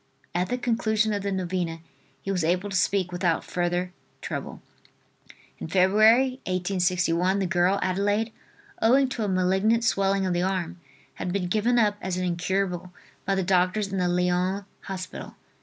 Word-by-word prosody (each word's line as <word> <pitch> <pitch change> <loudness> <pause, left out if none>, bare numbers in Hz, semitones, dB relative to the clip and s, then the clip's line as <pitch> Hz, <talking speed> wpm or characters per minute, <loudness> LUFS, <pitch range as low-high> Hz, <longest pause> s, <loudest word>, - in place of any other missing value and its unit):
At 180 +1 0
the 250 - 0
conclusion 225 -3 +1
of 205 - -1
the 200 0 -2
novena 180 -3 -2 0.4
he 195 - -2
was 180 -3 0
able 180 +5 0
to - - -3
speak 185 0 +1
without 175 -2 0
further 175 +1 -2 0.3
trouble. - - -5 1.0
In - - -5
Feb., 190 0 +3
1861, 185 -6 +2
the 195 - 0
girl 180 +1 +2
Adelaide, 205 +4 0 0.5
owing 260 +4 +4
to 240 -4 -3
a - - -1
malignant 190 +5 +2
swelling 195 -3 +1
of 185 - 0
the 175 - 0
arm, 180 -2 -2 0.3
had 180 - -4
been 190 -1 -1
given 220 +5 +2
up 210 -3 +3
as 185 -1 -3
incurable 180 0 -1 0.3
by 195 - +1
the 190 - 0
doctors 185 +3 +1
in 190 - 0
the 180 - +1
Lyons 180 +2 0 0.2
hospital. 185 -2 -7
190 Hz, 155 wpm, -26 LUFS, 180-205 Hz, 1.0 s, owing